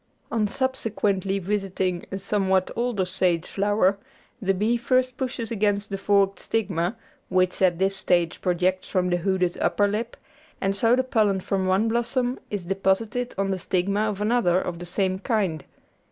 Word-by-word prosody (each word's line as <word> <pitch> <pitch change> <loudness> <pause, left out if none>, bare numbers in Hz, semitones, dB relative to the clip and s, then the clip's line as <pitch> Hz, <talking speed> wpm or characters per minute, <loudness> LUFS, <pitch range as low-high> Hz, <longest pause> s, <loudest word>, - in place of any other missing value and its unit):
On 215 -2 +1
subsequently 205 -6 -1
visiting 190 -2 -2
a 195 - -2
somewhat 190 -1 +1
older 235 -5 0
sage 180 -2 0
flower 200 -1 +1 0.4
the 195 -1 +1
bee 215 +5 +1
first 255 +1 +1
pushes 245 -3 -4
against 205 -1 0
the 195 - -1
forked 195 0 +2
stigma, 195 -2 -1 0.3
which 185 0 +1
at 180 -3 +4
this 195 +2 +1
stage 175 -2 +1
projects 185 +1 0
from 180 -2 +1
the 175 - +3
hooded 180 0 0
upper 205 - +2
lip, 220 +4 -3 0.4
and 195 0 0
so 230 +4 +4
the 260 - +1
pollen 215 -6 +2
from 190 0 -1
one 190 +4 +2
blossom 240 +2 0
is 200 -4 -4
deposited 195 +6 0
on 195 0 0
the 190 - -2
stigma 200 +4 0
of 205 -2 -4
another 210 -5 +3
of 175 -2 -4
the 175 - -6
same 185 +1 0
kind. 190 - -1
195 Hz, 165 wpm, -25 LUFS, 185-220 Hz, 0.4 s, at